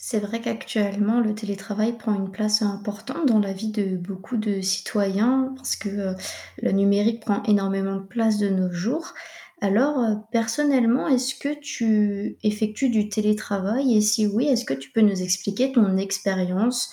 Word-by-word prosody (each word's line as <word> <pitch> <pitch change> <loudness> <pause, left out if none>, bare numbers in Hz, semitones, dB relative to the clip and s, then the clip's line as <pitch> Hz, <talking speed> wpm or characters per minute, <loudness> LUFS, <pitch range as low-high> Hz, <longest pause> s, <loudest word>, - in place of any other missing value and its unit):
C'est 220 -4 -2
vrai 210 +3 -4
qu'actuellement 220 -1 -1
le 215 -2 +1
télétravail 215 +2 -3
prend 215 -1 -1
une 195 -1 -3
place 215 +2 +1
importante 210 +8 -3
dans 225 -5 +5
la 195 -1 -1
vie 215 +3 -5
de 200 -3 -1
beaucoup 190 +6 -6
de 210 -3 -1
citoyens, 205 +7 +1
parce 265 0 -2
que, 205 - -6
heu, 195 -2 -3 0.5
le - - +1
numérique 200 +4 +2
prend 210 -2 -1
énormément 195 -1 +1
de 195 - -7
place 220 0 +1
de 205 -1 +1
nos 185 -1 +1
jours. 240 - -3 0.5
Alors, 250 +9 +2
heu, 225 -4 +1
personnellement, 240 +2 +2
est 260 - +4
ce 260 +1 -2
que 285 - -3
tu 215 -7 0
effectues 215 +4 0
du 215 -2 +1
télétravail 210 +3 +1
et - - +6
si 210 0 +3
oui, 220 +7 +1
est-ce 250 -4 +2
que 135 - -2
tu 135 0 -10
peux - - +2
nous 205 -3 +4
expliquer 195 +8 0
ton 210 -7 +4
expérience 195 +4 0
210 Hz, 175 wpm, -23 LUFS, 195-230 Hz, 0.5 s, et